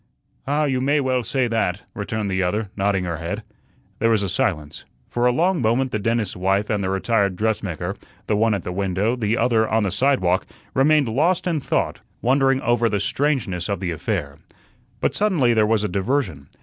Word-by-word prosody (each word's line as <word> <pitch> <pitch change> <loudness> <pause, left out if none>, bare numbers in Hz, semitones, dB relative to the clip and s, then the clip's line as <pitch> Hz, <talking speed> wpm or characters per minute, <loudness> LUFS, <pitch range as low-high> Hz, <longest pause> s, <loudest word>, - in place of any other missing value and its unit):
"Ah, 145 +2 +1
you 130 -3 0
may 145 +3 +2
well 130 -2 +1
say 125 +2 0
that," 110 -4 -1
returned 105 0 -3
the 95 0 0
other, 95 +3 -1
nodding 95 -1 +1
her 85 -2 -3
head. 85 +1 -4 0.6
There 115 - +2
was 110 -3 +2
a 100 - -1
silence. 75 -5 -1 0.3
For 120 +1 +2
a - - +4
long 170 +5 +1
moment 125 +3 +1
the 110 - -1
dentist's 115 -1 -1
wife 95 +3 0
and 105 -2 0
the 95 - -1
retired 100 0 +1
dressmaker, 100 -5 -2 0.3
the 105 - 0
one 110 0 +2
at 95 - -4
the - - -4
window, 100 +4 0
the 115 -2 0
other 110 -3 +2
on 110 0 +2
the 95 - 0
sidewalk, 100 -5 +1 0.3
remained 145 +1 +4
lost 155 +11 +1
in 170 -4 0
thought, - - -1 0.2
wondering 135 +1 +2
over 120 -1 +2
the 105 -1 0
strangeness 105 - -1
of 100 -3 -1
the 90 -2 -2
affair. 70 -3 -3 0.6
But - - +1
suddenly 170 - +2
there 110 -2 +3
was 110 -1 +2
a - - +1
diversion. 95 - -1
110 Hz, 195 wpm, -22 LUFS, 95-130 Hz, 0.6 s, a